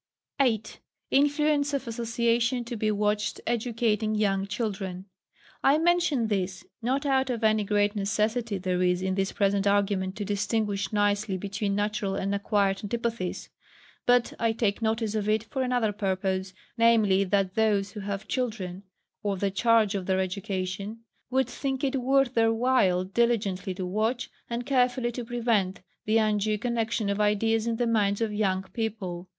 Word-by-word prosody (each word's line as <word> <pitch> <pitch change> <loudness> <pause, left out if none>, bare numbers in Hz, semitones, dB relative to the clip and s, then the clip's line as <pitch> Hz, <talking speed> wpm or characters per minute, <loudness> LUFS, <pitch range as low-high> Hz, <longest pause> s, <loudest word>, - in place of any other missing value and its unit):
8. 230 -6 0 0.3
Influence 290 0 +2
of 270 -2 -3
association 235 +1 0
to 240 +1 -5
be 215 -1 0
watched 210 0 0
educating 225 -2 0
young 195 -2 +1
children. 195 -3 -4 0.6
I 280 +2 +5
mention 335 -6 +2
this, 190 -3 -2 0.2
not 265 +5 0
out 265 -1 +2
of 235 -2 -2
any 215 -1 +3
great 205 +1 +1
necessity 215 +2 0
there 185 -1 -1
is 180 0 +2
in 190 0 0
this 195 +1 0
present 200 -1 +1
argument 200 -2 +1
to 210 - -4
distinguish 205 -1 -1
nicely 205 -1 +1
between 200 +1 -2
natural 205 -1 -1
and 195 0 -1
acquired 200 -1 +1
antipathies; 230 -3 -3 0.6
but 245 -1 +3
I 230 -1 +2
take 220 -1 0
notice 220 -1 0
of 215 -1 -1
it 215 0 +2
for 265 +4 -4
another 245 -4 +1
purpose, 190 -2 -2 0.2
viz. 210 -5 +4
that 195 -2 +1
those 205 -2 +1
who 215 - -7
have 200 +1 -4
children, 210 -8 -3 0.4
or 200 -2 -1
the 195 +1 0
charge 225 +1 +3
of 195 -3 -3
their 190 -1 +2
education, 195 +2 -3 0.3
would 260 -1 +1
think 265 +1 -3
it 270 -1 0
worth 270 0 +2
their 225 -1 +3
while 225 -6 +2
diligently 195 -2 0
to 185 0 -4
watch, 220 +7 -1 0.2
and 235 +1 -3
carefully 250 -2 +1
to 245 +1 -5
prevent 225 -5 0 0.2
the 215 +1 +3
undue 215 -1 +1
connexion 230 -1 -1
of 200 +1 0
ideas 220 +2 +2
in 230 - 0
the 240 +1 0
minds 205 -3 +1
of 225 -2 -1
young 190 -3 0
people. 195 -6 -4
215 Hz, 160 wpm, -27 LUFS, 195-235 Hz, 0.6 s, I